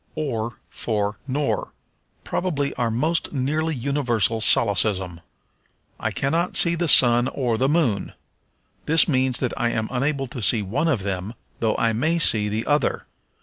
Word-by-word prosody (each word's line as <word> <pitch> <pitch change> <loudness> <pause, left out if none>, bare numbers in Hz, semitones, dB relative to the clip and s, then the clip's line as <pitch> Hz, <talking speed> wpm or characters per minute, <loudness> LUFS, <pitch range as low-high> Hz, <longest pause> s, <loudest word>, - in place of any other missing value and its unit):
Or 115 -6 -4
for 105 -2 -3
Nor. 140 +2 -2 0.5
Probably 145 -6 -2
our 120 -2 -2
most 155 +9 -1
nearly 155 +4 -1
universal 120 -5 -1
solecism. 100 -6 +2 0.8
"I - - -2
cannot 165 +6 -1
see 170 - +7
the 170 0 -2
sun 120 -3 +6
or 125 -4 -2
the 130 +4 0
moon." 145 -10 0 0.7
This 160 +1 +4
means 130 -4 +1
that 125 - -2
I 120 - -1
am 110 -1 -2
unable 135 +2 -1
to 120 - -7
see 110 0 +4
one 110 - -2
of 130 -12 0
them, 100 +3 -5 0.2
though 110 -2 -1
I 115 0 0
may 155 +9 0
see 105 -10 +2
the 110 +2 -3
other. 145 -3 0
125 Hz, 150 wpm, -22 LUFS, 110-145 Hz, 0.8 s, see